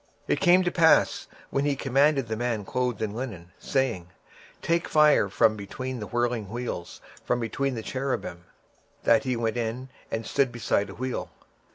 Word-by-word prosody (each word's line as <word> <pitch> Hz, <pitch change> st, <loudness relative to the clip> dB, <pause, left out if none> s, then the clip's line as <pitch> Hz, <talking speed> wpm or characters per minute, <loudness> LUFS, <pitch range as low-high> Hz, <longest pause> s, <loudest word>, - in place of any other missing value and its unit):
26:010:006 -, -, -37 dB, 0.2 s
And -, -, -2 dB
it -, -, -2 dB
came 180 Hz, 0 st, +6 dB
to 175 Hz, -, 0 dB
pass, 165 Hz, -2 st, +4 dB
that -, -, -23 dB
when 140 Hz, -, +1 dB
he -, -, +2 dB
had 140 Hz, -1 st, -2 dB
commanded 135 Hz, 0 st, +2 dB
the 110 Hz, -, -2 dB
man 115 Hz, -3 st, -2 dB
clothed 125 Hz, -1 st, -1 dB
with 110 Hz, -2 st, -1 dB
linen, 105 Hz, -7 st, -6 dB
saying, 120 Hz, -11 st, -1 dB, 0.5 s
Take 170 Hz, +1 st, +1 dB
fire 150 Hz, -9 st, +5 dB
from 110 Hz, +2 st, +3 dB
between 125 Hz, +5 st, -5 dB
the 105 Hz, -, -5 dB
wheels, 120 Hz, -5 st, -3 dB, 0.2 s
from 125 Hz, -, 0 dB
between 130 Hz, +3 st, -2 dB
the 110 Hz, -, -5 dB
cherubims; 125 Hz, -10 st, -3 dB, 0.6 s
then 115 Hz, -1 st, +5 dB
he 130 Hz, 0 st, -1 dB
went 115 Hz, 0 st, -1 dB
in, 120 Hz, +3 st, -3 dB, 0.2 s
and 115 Hz, 0 st, -3 dB
stood 135 Hz, +1 st, +1 dB
beside 110 Hz, -3 st, 0 dB
the 95 Hz, -, -10 dB
wheels. 130 Hz, +1 st, -3 dB
120 Hz, 185 wpm, -26 LUFS, 110-135 Hz, 0.6 s, came